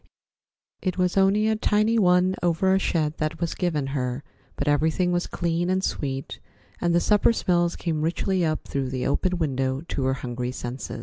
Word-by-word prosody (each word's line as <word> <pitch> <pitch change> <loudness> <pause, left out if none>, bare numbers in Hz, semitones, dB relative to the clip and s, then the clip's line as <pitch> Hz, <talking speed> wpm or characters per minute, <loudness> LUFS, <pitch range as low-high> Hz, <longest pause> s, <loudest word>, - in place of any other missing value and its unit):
It 185 -1 -2
was 180 -1 +1
only 200 +2 +3
a 220 - +2
tiny 215 +1 +2
one 180 -1 +3
over 175 +2 +2
a 190 - +3
shed 155 -4 0
that 155 -1 -2
was 170 -1 -1
given 160 -6 -1
her, 125 0 -2 0.3
but 140 - -3
everything 160 +5 +2
was 175 0 0
clean 170 +1 -1
and 185 +1 +1
sweet, 135 -5 -3 0.4
and 170 0 +1
the - - +5
supper 210 +5 +3
smells 175 -5 +1
came 160 -3 -2
richly 175 +3 0
up 155 -1 -1
through 135 -2 -2
the 130 -1 -3
open 180 +6 0
window 135 -4 -1
to 135 - -1
her 130 0 +1
hungry 125 -1 -4
senses. 125 0 -6
170 Hz, 185 wpm, -25 LUFS, 140-185 Hz, 0.4 s, the